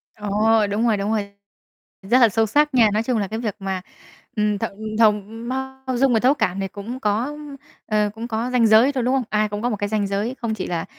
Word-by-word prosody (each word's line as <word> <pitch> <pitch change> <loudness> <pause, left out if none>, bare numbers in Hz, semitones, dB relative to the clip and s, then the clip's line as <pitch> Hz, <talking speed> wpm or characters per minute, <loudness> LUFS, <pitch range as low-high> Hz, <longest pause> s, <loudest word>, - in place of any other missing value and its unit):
Ồ, 210 +1 +2
đúng 215 +4 0
rồi, 215 - +2
đúng 200 +2 -2
rồi. 205 -2 -2 0.7
Rất 235 +6 +3
là 235 -3 +6
sâu 225 +1 +1
sắc 295 +5 +2
nha. 230 -4 +5
Nói 215 +1 +1
chung 240 -1 -1
là 200 - -1
cái 220 - -4
việc 220 -4 -3
mà, 190 -1 -4 0.5
ừm, 210 -1 +1
thổng 210 -2 -5 0.2
thồng 220 +1 +1
bao 265 0 -4
dung 265 0 +3
và 225 - +3
thấu 255 +4 +4
cảm 200 -8 -1
thì 195 - -2
cũng 220 +7 -7
có, 210 +3 0
ưm, 295 0 -8 0.3
ờ, 210 -1 +1
cũng 230 +2 -6
có 230 +2 -2
ranh 245 -2 +3
giới 225 +6 +5
thôi, 255 -3 -1
đúng 255 +2 +1
không? 265 - +1
Ai 210 0 +1
cũng 205 0 -5
có 240 - +1
một 215 - -1
cái 205 0 -3
ranh 210 -1 0
giới, 200 +5 -2
không 230 -3 -2
chỉ 205 - -5
là 170 -2 -3
220 Hz, 250 wpm, -22 LUFS, 205-245 Hz, 0.7 s, là